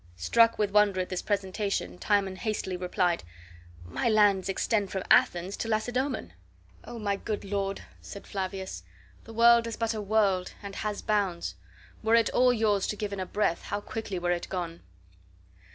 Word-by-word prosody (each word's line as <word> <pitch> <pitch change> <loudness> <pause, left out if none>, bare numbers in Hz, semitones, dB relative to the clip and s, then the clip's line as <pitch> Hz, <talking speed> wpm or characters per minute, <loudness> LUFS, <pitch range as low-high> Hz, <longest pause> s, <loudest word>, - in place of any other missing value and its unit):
Struck 230 - +4
with 205 -2 0
wonder 205 -2 +4
at 180 - -2
this 185 - -2
presentation, 195 - -2
Timon 195 - +1
hastily 210 -3 -2
replied: 180 -1 0 0.6
"My 85 - -1
lands 205 -3 +4
extend 200 +1 0
from 190 - -2
Athens 180 +3 +4
to - - -3
Lacedoemon." 240 - -1 0.5
"O 240 - -8
my 200 -3 -1
good 210 0 -4
lord," 195 0 -2 0.2
said 200 - -10
Flavius, 190 - -4 0.4
"the 225 - -10
world 235 0 +6
is 230 - -5
but 230 0 0
a 215 - -3
world, 200 -3 +1
and 200 0 -7
has 210 -1 -3
bounds. 200 -5 0 0.5
Were 225 +1 +3
it 230 -1 +3
all 250 0 +4
yours 215 -4 +1
to - - -2
give 205 -1 -4
in 200 - -4
a 185 - -3
breath, 205 -5 0
how 205 - -2
quickly 205 -2 -5
were 175 0 0
it 175 -1 -2
gone!" 170 -3 -4
200 Hz, 170 wpm, -28 LUFS, 185-220 Hz, 0.6 s, world